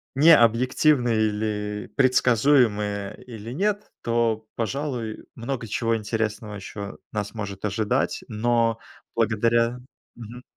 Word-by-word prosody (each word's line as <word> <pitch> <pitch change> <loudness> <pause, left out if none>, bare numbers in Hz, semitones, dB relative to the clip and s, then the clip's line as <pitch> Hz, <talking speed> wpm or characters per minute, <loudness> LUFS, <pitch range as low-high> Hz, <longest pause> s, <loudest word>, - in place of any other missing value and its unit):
не 155 +4 +8
объективны, 125 +3 +3
или 105 -1 -1
предсказуемые, 115 -6 +2
или 115 -2 -8
нет,- 205 +8 -1
то, 115 -2 0
пожалуй, 120 -2 -3
много 120 0 -4
чего 115 +2 0
интересного 110 -1 -3
ещё 100 0 -7
нас 105 -1 -3
может 100 -3 -5
ожидать. 105 +1 0
Но 115 0 +1 0.4
благодаря 115 +2 +2 0.4
Мгм. 120 +2 -10
115 Hz, 100 wpm, -24 LUFS, 105-125 Hz, 0.4 s, не